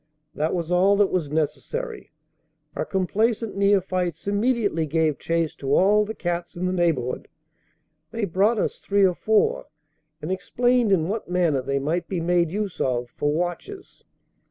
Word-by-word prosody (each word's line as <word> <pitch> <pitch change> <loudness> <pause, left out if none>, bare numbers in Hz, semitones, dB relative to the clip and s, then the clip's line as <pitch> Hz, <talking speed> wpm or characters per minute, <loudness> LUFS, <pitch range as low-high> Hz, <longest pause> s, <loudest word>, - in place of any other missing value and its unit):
That 155 +4 -1
was 170 -1 -3
all 190 +3 +4
that 205 -1 +3
was 170 -6 -1
necessary; 430 - -3 0.7
our - - -2
complaisant 215 +4 0
neophytes 185 -4 +1
immediately 205 -5 0
gave 155 -1 +1
chase 165 -1 -1
to 140 0 0
all 210 +3 +4
the 220 +1 -6
cats 175 -1 -3
in 175 +1 -3
the 185 - 0
neighbourhood. 165 -9 0 0.8
They 225 +3 -2
brought 200 +5 +2
us - - -1
three 200 0 +2
or 185 - +3
four, 215 +4 +1 0.5
and 155 - -5
explained 245 +4 +1
in 165 -4 +2
what 210 +1 -4
manner 170 -6 +1
they 140 +2 -1
might 155 +6 -1
be 185 - -2
made 170 0 +2
use 200 +1 -3
of 120 -2 -1
for 145 - 0
watches. 180 - -5
180 Hz, 155 wpm, -24 LUFS, 160-205 Hz, 0.8 s, all